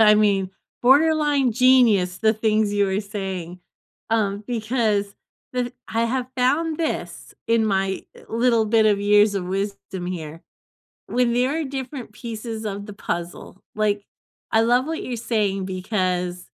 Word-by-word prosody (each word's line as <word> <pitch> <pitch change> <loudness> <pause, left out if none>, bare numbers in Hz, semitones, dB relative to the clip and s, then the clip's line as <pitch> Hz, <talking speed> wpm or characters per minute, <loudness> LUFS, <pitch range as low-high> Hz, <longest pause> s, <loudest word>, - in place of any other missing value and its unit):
I 210 -1 +7
mean, 200 -3 +2 0.3
borderline 290 -1 +4
genius, 225 -7 +4
the 220 -1 +3
things 215 -1 +1
you're 200 -1 +1
saying, 190 -4 -5 0.5
um, 210 -2 0
because 215 -4 0 0.4
with 250 -1 -2 0.2
I 225 +1 0
have 250 +1 -1
found 300 +6 +1
this 325 -2 -4
in 230 -1 +3
my, 195 -2 0
eh, - - -15
little 230 0 +2
bit 220 0 +4
of 205 -2 +3
years 205 0 +4
of 195 -2 -2
wisdom 195 -1 -4
here. 165 -3 -6 0.7
When 245 -1 +1
there 255 +6 +1
are - - -1
different 265 -4 -6
pieces 225 -1 -6
of 200 -1 -4
the 210 - -9
puzzle. 175 0 -5
Like, 210 -1 0 0.5
I 220 - +4
love 245 +3 +3
what 320 +1 -4
you're 245 -2 -4
saying 205 -4 -1
because, 185 -2 -2
215 Hz, 145 wpm, -23 LUFS, 195-245 Hz, 0.7 s, I